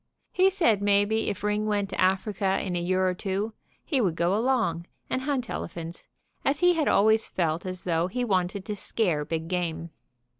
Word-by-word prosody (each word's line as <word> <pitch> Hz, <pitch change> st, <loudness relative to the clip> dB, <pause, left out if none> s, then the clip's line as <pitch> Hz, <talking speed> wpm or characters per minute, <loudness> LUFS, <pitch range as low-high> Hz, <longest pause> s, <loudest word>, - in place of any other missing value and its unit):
He 370 Hz, +1 st, +4 dB
said 320 Hz, -, +2 dB
maybe 205 Hz, +2 st, +2 dB
if 195 Hz, -, -5 dB
Ring 210 Hz, +1 st, 0 dB
went 205 Hz, -2 st, 0 dB
to -, -, -2 dB
Africa 190 Hz, +1 st, +1 dB
in 185 Hz, -2 st, -3 dB
a 175 Hz, -, -1 dB
year 185 Hz, +1 st, +1 dB
or 185 Hz, -, +1 dB
two 200 Hz, +4 st, -3 dB, 0.3 s
he 275 Hz, -5 st, +1 dB
would 180 Hz, -7 st, +1 dB
go 170 Hz, +3 st, +1 dB
along 220 Hz, -8 st, 0 dB, 0.2 s
and 260 Hz, -, 0 dB
hunt 260 Hz, -3 st, -1 dB
elephants, 170 Hz, -3 st, -6 dB, 0.4 s
as 280 Hz, +2 st, +1 dB
he 355 Hz, 0 st, +6 dB
had 320 Hz, -3 st, 0 dB
always 220 Hz, +2 st, +4 dB
felt 170 Hz, 0 st, -1 dB
as 185 Hz, 0 st, -3 dB
though 170 Hz, -1 st, +1 dB
he 245 Hz, +6 st, -2 dB
wanted 190 Hz, -2 st, 0 dB
to 210 Hz, -, -3 dB
scare 180 Hz, -7 st, 0 dB
big 160 Hz, +2 st, -3 dB
game. 170 Hz, -2 st, -3 dB
195 Hz, 190 wpm, -27 LUFS, 175-220 Hz, 0.4 s, he